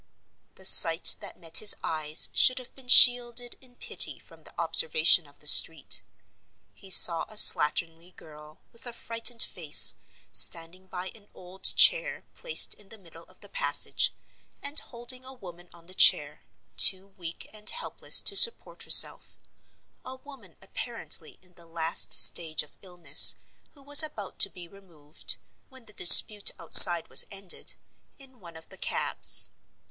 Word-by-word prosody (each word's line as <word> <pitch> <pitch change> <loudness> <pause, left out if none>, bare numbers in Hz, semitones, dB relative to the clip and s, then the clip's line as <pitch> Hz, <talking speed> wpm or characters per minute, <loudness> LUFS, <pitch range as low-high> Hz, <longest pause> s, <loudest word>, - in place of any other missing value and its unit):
The 190 - -14
sight 165 -2 +6
that - - -15
met 165 -2 -4
his 215 - +3
eyes 155 0 -3
should 255 - 0
have 255 -1 -14
been 265 -2 -19
shielded 245 -1 +1
in 250 -2 -24
pity - - -6
from - - -21
the - - -18
observation 475 0 0
of - - -26
the - - -20
street. - - +3 0.7
He 195 - -20
saw 170 -2 +4
a 215 - -14
slatternly 165 -1 +1
girl, 150 0 -20
with 230 +1 -15
a 240 - -11
frightened 230 0 -9
face, 160 -5 +2 0.4
standing 170 +3 -3
by 185 0 -12
an 210 -2 -22
old 185 +1 -20
chair - - -2
placed - - 0
in 205 -2 -23
the 225 - -16
middle 165 -4 -21
of - - -29
the - - -17
passage, - - -3 0.5
and 285 +1 -4
holding 250 0 -10
a 260 +1 -16
woman 175 -7 -19
on 170 -1 -22
the 185 - -16
chair, - - -1 0.4
too 195 0 0
weak 175 -4 -13
and 210 -1 -4
helpless 480 - -1
to 400 - -3
support 465 +4 +2
herself—a 260 - -3
woman 260 - -21
apparently 195 -5 -7
in 180 -1 -28
the 170 -1 -19
last 165 0 -5
stage 160 -2 +2
of 150 - -21
illness, 180 -3 +4 0.4
who 280 - -25
was 290 +2 +5
about 225 -11 -13
to - - 0
be 180 -3 -17
removed, 165 -6 -10 0.3
when 260 -3 -20
the 210 - -15
dispute 205 +2 +4
outside 175 -3 +4
was - - +1
ended, 195 -2 -8 0.4
in 265 -2 -21
one 170 -4 -18
of 160 - -17
the - - -18
cabs. - - -2
195 Hz, 155 wpm, -22 LUFS, 170-245 Hz, 0.7 s, sight